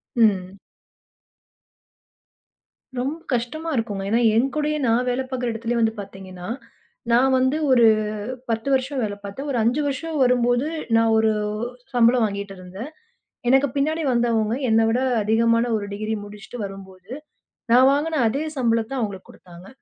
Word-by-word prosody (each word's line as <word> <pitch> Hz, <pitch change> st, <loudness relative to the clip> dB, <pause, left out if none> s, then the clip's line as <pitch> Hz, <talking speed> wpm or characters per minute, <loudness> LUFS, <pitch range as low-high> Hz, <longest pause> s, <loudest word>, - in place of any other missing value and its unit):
ம். 195 Hz, -4 st, +2 dB, 2.4 s
ரொம்ப 275 Hz, +6 st, -2 dB
கஷ்டமா 255 Hz, +8 st, -2 dB
இருக்கும்ங்க. 210 Hz, -5 st, -2 dB
ஏன்னா 230 Hz, +3 st, +2 dB, 0.2 s
என் 240 Hz, +4 st, +3 dB
கூடயே 300 Hz, 0 st, 0 dB
நான் 235 Hz, +2 st, +2 dB
வேல 250 Hz, +1 st, 0 dB
பார்க்கற 250 Hz, -2 st, -2 dB
இடத்திலேயே 230 Hz, +1 st, -2 dB
வந்து 220 Hz, 0 st, +2 dB
பார்த்தீங்கன்னா, 190 Hz, -2 st, -9 dB, 0.6 s
நான் 260 Hz, +3 st, +4 dB
வந்து 260 Hz, +3 st, +2 dB
ஒரு 240 Hz, -2 st, +6 dB, 0.6 s
10 225 Hz, +2 st, -2 dB
வருஷம் 265 Hz, +1 st, 0 dB
வேல 205 Hz, -2 st, -2 dB
பார்த்தேன். 200 Hz, +9 st, -6 dB
ஒரு 255 Hz, -, -1 dB
5 250 Hz, +7 st, +2 dB
வருஷம் 305 Hz, +3 st, -3 dB
வரும்போது 245 Hz, +1 st, +2 dB, 0.3 s
நான் 225 Hz, 0 st, +4 dB
ஒரு 220 Hz, 0 st, +3 dB, 0.6 s
சம்பளம் 240 Hz, 0 st, +4 dB
வாங்கிட்டு 200 Hz, -1 st, -5 dB
இருந்தேன். 185 Hz, +8 st, -8 dB, 0.6 s
எனக்குப் 270 Hz, 0 st, +3 dB
பின்னாடி 310 Hz, +3 st, 0 dB
வந்தவங்க 235 Hz, -2 st, +1 dB
என்னைவிட 225 Hz, +2 st, +3 dB, 0.2 s
அதிகமான 230 Hz, +2 st, +3 dB
ஒரு 205 Hz, -, -4 dB
டிகிரி 215 Hz, +2 st, -3 dB
முடிச்சிட்டு 205 Hz, +3 st, -10 dB
வரும்போது 195 Hz, 0 st, -11 dB, 0.6 s
நான் 255 Hz, +2 st, +7 dB
வாங்குன 310 Hz, +2 st, 0 dB
அதே 275 Hz, +8 st, -1 dB
சம்பளத்த 230 Hz, +1 st, 0 dB
அவங்களுக்கு 200 Hz, -4 st, -4 dB
குடுத்தாங்க. 175 Hz, +1 st, -14 dB
230 Hz, 135 wpm, -23 LUFS, 210-260 Hz, 2.4 s, நான்